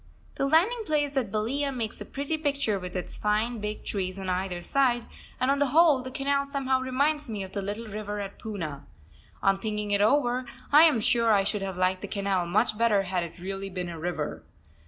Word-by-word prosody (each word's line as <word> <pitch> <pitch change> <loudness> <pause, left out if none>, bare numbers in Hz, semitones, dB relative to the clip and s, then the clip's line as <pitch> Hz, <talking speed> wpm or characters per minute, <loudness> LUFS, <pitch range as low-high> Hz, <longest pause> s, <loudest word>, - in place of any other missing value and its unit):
The 275 - 0
landing 370 - +3
place 290 -2 +1
at 245 -7 0
Balia 270 +7 0
makes 230 -4 -4
a - - -5
pretty 280 +3 -2
picture 280 -9 0
with 180 0 -7
its 180 - -5
fine 215 +3 0
big 210 0 -5
trees 185 -2 -2
on 190 -1 -3
either 180 -1 -2
side, 250 -2 +2 0.3
and 255 +2 +2
on 280 - +1
the 285 - +3
whole 300 -1 +5
the 255 - -6
canal 280 +1 0
somehow 265 -2 0
reminds 285 +2 0
me 210 -3 -3
of 190 - -9
the 200 - -3
little 205 +4 -4
river 210 0 -4
at 200 -1 -6
Poona. 165 -10 -5 0.6
On 195 -1 +3
thinking 210 -1 -3
it 200 0 +3
over 250 +2 +3 0.3
I 300 +3 +9
am 295 -9 +3
sure 230 +1 +3
I 200 -2 +4
should 205 +1 -2
have 190 -2 -4
liked 185 0 +1
the - - -5
canal 195 -3 -1
much 215 +5 +2
better 215 -4 +4
had 180 -2 -1
it 170 +1 -8
really 195 +2 -5
been 180 -2 -4
a 165 -1 -7
river. 160 -3 -3
215 Hz, 215 wpm, -27 LUFS, 195-275 Hz, 0.6 s, I